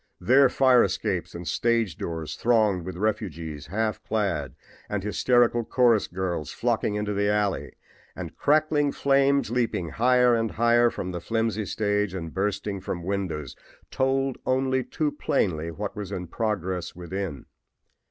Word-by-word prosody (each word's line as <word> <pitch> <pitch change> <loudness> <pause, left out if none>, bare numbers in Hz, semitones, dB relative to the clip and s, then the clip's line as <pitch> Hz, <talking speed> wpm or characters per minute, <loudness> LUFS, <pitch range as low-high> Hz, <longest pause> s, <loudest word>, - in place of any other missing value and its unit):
There 130 +7 +5
fire 130 -2 +5
escapes 95 -3 -2
and 85 -1 -7
stage 115 -6 +1
doors 80 -2 -5
thronged 110 -7 +2
with 95 -2 -5
refugees, 85 -8 -3
half 110 +5 -1
clad 85 - -2 0.3
and 105 -2 -2
hysterical 120 +2 +2
chorus 120 -2 +3
girls 85 -4 -3
flocking 115 -3 0
into 105 0 -1
the 100 +1 +1
alley, 105 -1 0 0.4
and - - -7
crackling 150 -1 +2
flames 140 -2 +2
leaping 115 -9 0
higher 125 +4 +4
and 115 -1 +1
higher 120 +1 +3
from 90 -5 -5
the 90 -1 -5
flimsy 110 -2 -1
stage 105 -2 0
and 80 -4 -5
bursting 100 0 -2
from 85 -2 -4
windows, 90 -7 -3 0.4
told 135 0 0
only 130 0 +1
too 150 +4 -2
plainly 85 - -1
what 100 +5 -5
was 105 -3 -6
in 90 - -4
progress 95 -4 -3
within. 90 -3 -5
105 Hz, 145 wpm, -26 LUFS, 90-120 Hz, 0.4 s, There